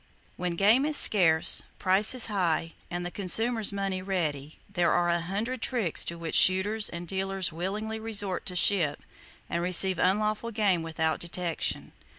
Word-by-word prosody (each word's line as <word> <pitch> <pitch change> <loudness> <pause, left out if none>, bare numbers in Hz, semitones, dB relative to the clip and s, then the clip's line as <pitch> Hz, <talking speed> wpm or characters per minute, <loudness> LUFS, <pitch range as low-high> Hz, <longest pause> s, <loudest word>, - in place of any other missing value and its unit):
When 180 -1 -4
game 215 +9 +3
is 305 -1 0
scarce, 165 -6 +3 0.2
prices 205 +6 +1
high 170 -5 -2 0.2
and 175 0 -5
the 175 - -5
consumer's 220 +4 +1
money 195 -2 -3
ready, 155 -6 -4
there 175 -1 0
are 175 0 +1
a 170 0 0
hundred 215 +8 -4
tricks 225 - 0
to 170 - -5
which 165 -1 -6
shooters 205 +3 +5
and 170 0 -8
dealers 190 -1 -2
willingly 210 +6 -4
resort 205 -4 -2
to 180 - -1
ship 175 -5 +2 0.4
and 170 - -3
receive 185 +1 +3
unlawful 210 +4 0
game 205 -6 0
without 160 -1 -2
detection. 170 -1 -2
185 Hz, 155 wpm, -27 LUFS, 170-210 Hz, 0.4 s, shooters